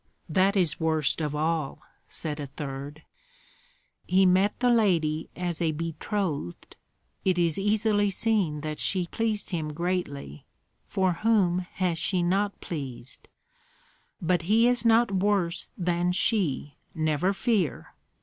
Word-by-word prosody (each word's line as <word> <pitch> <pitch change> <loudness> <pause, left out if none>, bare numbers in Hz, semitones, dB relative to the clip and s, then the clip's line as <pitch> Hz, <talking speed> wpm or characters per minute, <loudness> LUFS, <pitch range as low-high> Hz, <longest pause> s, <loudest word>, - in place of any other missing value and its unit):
"That 190 +4 +2
is 170 -5 +1
worst 160 -2 +1
of 150 -1 -2
all," 155 -2 -1 0.2
said 150 -2 -3
a 145 - -4
third. 140 +1 -7 1.0
"He 190 +1 +4
met 190 +3 +3
the 245 0 +3
lady 170 -9 +2
as 175 -1 -3
a 160 -2 +1
betrothed. 165 - -3 0.5
It 185 -2 +2
is 170 -1 +1
easily 205 0 +2
seen 195 -7 0
that 155 0 -4
she 185 -2 +1
pleased 215 +2 -2
him 155 -4 -2
greatly, 155 - -3 0.4
for 190 -2 +1
whom 190 -2 +2
has 180 -3 -1
she 180 +1 +1
not 200 +3 0
pleased?" 130 -6 -7 0.9
"But 175 0 +1
he 225 +3 +5
is 245 -1 +2
not 230 -1 +4
worse 190 -3 0
than 175 0 0
she, 175 - 0 0.2
never 155 +3 +1
fear! 200 - -1
175 Hz, 130 wpm, -27 LUFS, 155-200 Hz, 1.0 s, he